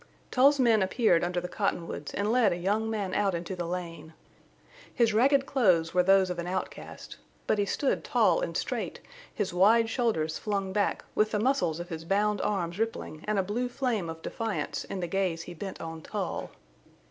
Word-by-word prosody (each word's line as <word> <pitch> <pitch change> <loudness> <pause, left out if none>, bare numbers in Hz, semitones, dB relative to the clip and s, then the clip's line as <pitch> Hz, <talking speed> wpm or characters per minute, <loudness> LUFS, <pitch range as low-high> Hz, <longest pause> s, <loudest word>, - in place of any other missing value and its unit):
Tull's 280 +3 +5
men 230 -4 +4
appeared 190 -3 +3
under 175 0 0
the 180 - -5
cottonwoods 175 -7 -3
and 205 +2 0
led 235 -5 +4
a 175 - -1
young 205 +5 0
man 205 -4 -2
out 200 -3 +1
into 170 +2 -4
the 175 -1 -4
lane. 170 -2 -6 0.8
His 230 -3 +2
ragged 270 +5 +4
clothes 185 -13 +2
were 180 - +4
those 190 0 +4
of 175 - -4
an 170 - -4
outcast. 185 +1 -6 0.3
But 210 - +1
he 205 - +2
stood 275 +6 0
tall - - +3
and - - -2
straight, - - -3 0.3
his 200 -4 -3
wide 225 +5 +4
shoulders 185 -12 0
flung 195 -3 -2
back, 205 0 0
with 215 0 +2
the 210 - -1
muscles 220 - +1
of 175 +1 -6
his 160 -2 -5
bound 205 +3 +1
arms 180 -2 -2
rippling 225 -8 -3
and 215 -1 +1
a 195 - +2
blue 235 +6 -2
flame 240 -9 -1
of 160 0 -8
defiance 225 -2 -3
in 190 - -5
the 175 - -2
gaze 175 -2 -1
he 175 - -9
bent 190 +3 -7
on 165 0 -6
Tull. - - -4
195 Hz, 195 wpm, -28 LUFS, 175-220 Hz, 0.8 s, Tull's